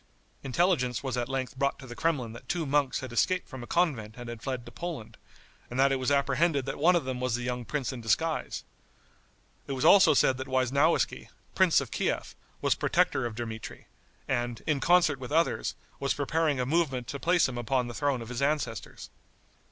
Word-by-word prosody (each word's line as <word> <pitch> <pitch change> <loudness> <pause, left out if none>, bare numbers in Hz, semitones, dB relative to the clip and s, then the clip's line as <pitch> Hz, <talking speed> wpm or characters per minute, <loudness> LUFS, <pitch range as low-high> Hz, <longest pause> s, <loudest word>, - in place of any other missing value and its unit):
Intelligence 135 -3 +1
was 130 -2 -2
at 120 0 -2
length 135 -1 -3
brought 140 0 +1
to 135 - -11
the 120 -1 -9
Kremlin 140 -6 -1
that 115 - -12
two 175 -4 -1
monks 140 -1 +1
had 130 -2 -7
escaped 180 +9 +1
from 130 -3 -8
a 120 - -8
convent 125 -12 0
and 120 -1 -7
had 120 -1 -7
fled 130 -2 -4
to - - -10
Poland, 165 -10 -6 0.5
and 125 - -4
that 135 +1 +5
it 135 - +2
was 130 0 -1
apprehended 140 +1 +2
that 135 - -4
one 175 +5 +5
of 170 - +1
them 130 -1 -3
was 125 -2 0
the 120 - -4
young 125 -1 -3
prince 140 -2 -2
in 125 - -7
disguise; 160 +8 -1 1.0
it 140 - -3
was 130 - -1
also 195 -6 +7
said 130 -1 +3
that 130 +1 -5
Weisnowiski, 135 +5 +1 0.3
prince - - +4
of - - -7
Kief, - - -2 0.3
was - - +3
protector 120 - +1
of 115 - -8
Dmitri, 115 -1 -6 0.4
and, 120 -1 -2
in 150 -3 +1
concert 170 -3 +4
with 130 +1 -7
others, 165 +2 +1 0.2
was 140 - 0
preparing 150 0 0
a 125 - 0
movement 135 -4 0
to 140 - -4
place 175 0 +3
him 125 -2 -5
upon 125 +2 0
the 120 - -6
throne 140 -2 -1
of 115 - -10
his 125 +1 -4
ancestors. 140 -7 -2
135 Hz, 205 wpm, -29 LUFS, 120-150 Hz, 1.0 s, also